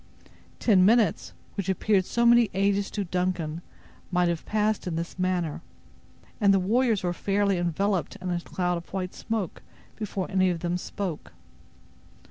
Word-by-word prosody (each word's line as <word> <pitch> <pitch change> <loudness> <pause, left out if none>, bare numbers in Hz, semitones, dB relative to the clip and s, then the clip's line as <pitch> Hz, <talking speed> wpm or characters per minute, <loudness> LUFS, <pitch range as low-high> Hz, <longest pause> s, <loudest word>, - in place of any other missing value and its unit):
Ten 195 -6 +4
minutes, 220 +2 +3 0.2
which 200 -2 -3
appeared 190 0 +2
so 235 +4 +1
many 235 -2 +6
ages 200 +1 +1
to 205 - -2
Duncan, 175 -3 -2 0.5
might 180 -1 +2
have 170 -2 -3
passed 215 -2 0
in 170 - -2
this 170 +2 -5
manner; 180 -4 -1 0.8
and 200 -3 +5
the 195 - +5
warriors 225 +2 +2
were 175 -1 0
fairly 200 0 +1
enveloped 175 +1 0
in 180 -1 -3
a 175 - 0
cloud 180 0 -1
of 170 - -17
white 185 -1 -3
smoke 220 -6 -4 0.3
before 200 -3 -3
any 185 -1 +3
of 170 -2 -2
them 175 0 -1
spoke. 180 -4 -5
185 Hz, 155 wpm, -26 LUFS, 175-205 Hz, 0.8 s, many